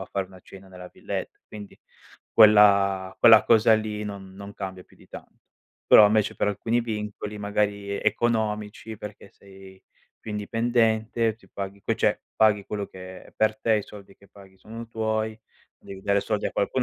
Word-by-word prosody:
a 95 - -5
fare 95 -1 -3
una 95 -1 -16
cena 95 +1 -15
nella 90 -1 -12
villetta, - - -6
quindi 105 -2 -11 0.5
quella 100 -3 +5
quella 115 -2 +7
cosa 110 -1 +4
lì 105 -1 -3
non 95 -2 -8
non 100 +1 -10
cambia 95 -2 -7
più - - -24
di - - -20
tanto. - - -13 0.5
Però 105 - +8
invece, 105 0 +1
per - - 0
alcuni 115 +4 -1
vincoli 105 -2 -6
magari 100 0 -2
e - - -7
economici, 110 -1 -1
perché 105 -1 -10
sei 95 -1 -16 0.4
più 110 - -8
indipendente, 115 +1 0
ti 95 -4 -23
paghi 100 +1 -7
che - - 0
cioè - - +1 0.2
paghi 105 -2 +3
quello 100 -1 -4
che 95 0 -11
è - - -19
per 110 0 +1
te, 110 -1 +2
i 105 - -2
soldi 100 -1 -14
che 100 - -22
paghi 95 -2 -18
sono 115 +1 -10
tuoi, 110 -1 -2 0.4
devi 95 -1 -11
dare 100 0 +1
soldi 105 0 -2
a - - -3
qualcun 125 +5 -1
105 Hz, 180 wpm, -25 LUFS, 100-110 Hz, 0.5 s, Però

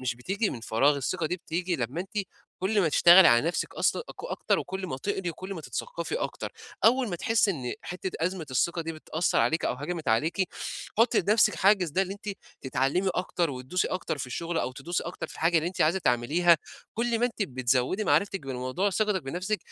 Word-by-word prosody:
مش 125 -2 -1
بتيجي 195 - -1
من 115 - -6
فراغ، 135 +6 +2
الثقة 160 +5 -1
دي 180 +3 -2
بتيجي 175 +1 -2
لمّا 130 +5 -3
أنتِ 195 +4 -5 0.4
كلّ 205 +3 +1
ما 175 - +3
تشتغلي 175 +4 +8
على 120 +6 +4
نفْسِك 170 - -2
أصلًا - - +1
أكو - - -8
أكتر، - - 0
وكلّ 190 +1 -4
ما 130 - -4
تقري 190 +3 -2
وكلّ 185 +4 -7
ما 165 - -6
تتثقّفي - - -4
أكتر، - - -4 0.3
أول 245 +1 +4
ما 175 - -3
تحسّي 220 +3 +2
إن 130 -9 -3
حتّة 180 +1 -5
أزمة 175 -1 -2
الثقة 170 +7 +1
دي 165 0 -4
بتأثّر 160 +2 -1
عليكِ 160 +1 +1
أو - - 0
هَجَمِت 160 +3 -4
عليكِ، 160 - +1 0.5
حطّي 230 0 +4
لنفْسِك 210 +1 +3
حاجز 190 0 +3
ده 185 +6 +2
اللي 195 0 -4
أنتِ 205 +1 -10 0.3
تتعلمي 135 +9 0
أكتر 180 -2 -1
وتدوسي 130 +7 -2
أكتر 185 -4 -3
في 130 - -3
الشغل، 165 +6 -3
أو 130 - -2
تدوسي 155 +7 -3
أكتر 175 - -5
في - - -12
الحاجة 165 +1 +2
اللي 160 - -1
أنتِ 185 - -7
عايزة 165 +5 +3
تعمليها، 155 +6 +3 0.4
كلّ 235 0 0
ما 240 - +3
أنتِ 230 -3 -3
بتزوّدي 130 - 0
معرِفتِك 200 -1 +2
بالموضوع 130 +10 -1
ثقتِك 210 -2 0
بنفسِك 180 +9 -2
175 Hz, 200 wpm, -27 LUFS, 140-195 Hz, 0.5 s, تشتغلي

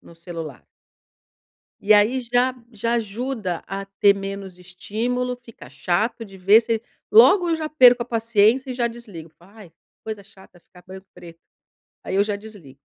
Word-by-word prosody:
no - - -17
celular. 165 - -9 1.2
E 205 +1 +4
aí 215 +5 +4
já 245 +1 +1 0.2
já 230 +2 -2
ajuda 220 -4 -3
a 195 +1 -5
ter 200 +1 +3
menos 195 -2 -7
estímulo, 230 +7 -4
fica 235 -2 -15
chato 215 +6 -2
de 195 -3 -14
ver, 200 +4 +6
você 225 -1 -2 0.3
logo 405 -5 +6
eu 325 - +1
já 310 -1 -4
perco 250 -5 +6
a - - -10
paciência 230 +2 +2
e - - -4
já 240 -1 0
desligo, 215 -9 -10
"ai 195 0 -16 0.3
coisa 215 -2 -6
chata 190 -3 -20
ficar 180 +1 -20
branco 190 +1 -11
preto." 165 -1 -14 0.6
Aí - - -4
eu 200 +1 +3
já 205 -1 -2
desligo. 200 -11 -14
210 Hz, 165 wpm, -22 LUFS, 190-240 Hz, 1.2 s, ver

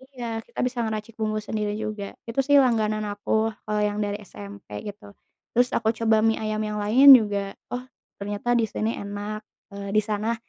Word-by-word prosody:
Iya, 240 -2 -5 0.2
kita - - -11
bisa 250 0 -7
ngeracik 220 0 -4
bumbu 215 0 0
sendiri 210 0 -3
juga. 215 -1 -4 0.2
Itu 230 +3 -3
sih 285 +1 +5
langganan 215 -4 +2
aku 205 0 -6 0.3
kalau 210 0 -1
yang 205 0 -3
dari 205 0 -3
SMP 200 0 -11 0.2
gitu. 205 0 -10 0.4
Terus 245 +1 +4
aku 225 -1 +1
coba 220 -1 +3
mie 225 0 +3
ayam 215 0 -2
yang 210 0 -3
lain 265 +6 +9
juga 205 -4 0 0.2
oh 245 - -2 0.4
ternyata 205 +3 -4
di 225 - +1
sini 215 +2 -2
enak, 205 +1 -5 0.3
eee, 200 0 -6
di 215 - +5
sana 215 +2 -1
215 Hz, 185 wpm, -25 LUFS, 205-225 Hz, 0.4 s, lain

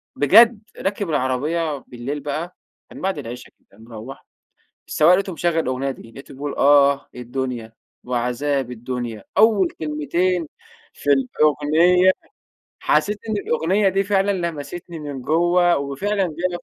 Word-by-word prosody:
بجد 220 - +6 0.2
راكِب 200 -1 -2
العربية 150 +3 -1
بالليل 125 +4 -5
بقى 155 +5 -5 0.4
من - - -10
بَعد 190 -4 -1
العِشا 125 -2 -8
كده 100 - -25
مروّح، 115 +3 -10 0.6
السوّاق 155 +4 +4
لقيته 190 0 0
مشغّل 170 0 0
الأغنية 135 -2 -1
دي، 115 -3 -12
لقيته 135 - -12
بيقول: 140 +1 -5
"آه 140 0 +4
الدنيا 125 -2 -5 0.3
وعذاب 125 +2 -1
الدنيا."، 120 -2 -5
أول 210 -3 +5
كلمتين 160 +3 -1 0.5
في 145 - -5
الأغنية 155 +7 +3 0.7
حسّيت 210 0 +1
إن - - 0
الأغنية 190 +6 +2
دي 195 +1 +1
فعلًا 200 0 +1
لمسِتني 170 -1 -5
من 145 -3 -6
جوَّه 175 +4 +3
وفعلًا 140 +9 -1
جا 175 +1 -2
لي. 175 - -3
150 Hz, 130 wpm, -21 LUFS, 130-180 Hz, 0.7 s, بجد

